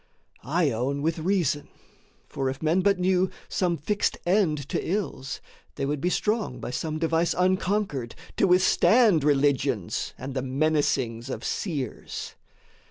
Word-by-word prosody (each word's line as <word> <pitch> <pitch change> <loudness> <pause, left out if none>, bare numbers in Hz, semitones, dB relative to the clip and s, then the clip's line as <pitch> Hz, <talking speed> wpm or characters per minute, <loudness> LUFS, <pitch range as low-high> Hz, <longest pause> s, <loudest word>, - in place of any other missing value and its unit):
I 155 +2 +1
own 135 +5 -1
with 165 +1 0
reason: 160 -5 0 0.6
for, 135 -1 -2
if 135 +3 -6
men 165 +4 +3
but 200 +1 +3
knew 185 0 +2 0.2
Some 175 -3 0
fixed 205 +8 0
end 170 -7 +2
to - - -1
ills, 180 -8 -3 0.3
they 140 - -2
would 145 0 -2
be 180 - +1
strong 210 - -1
By 120 - -5
some 155 +4 -3
device 165 +1 +1
unconquered 185 - 0 0.2
to 195 - +4
withstand 185 - +4
Religions 140 -8 +1
and 135 +1 -6
the 130 - -1
menacings 135 -4 0
of - - -5
seers. 145 - -4
155 Hz, 140 wpm, -26 LUFS, 135-185 Hz, 0.6 s, to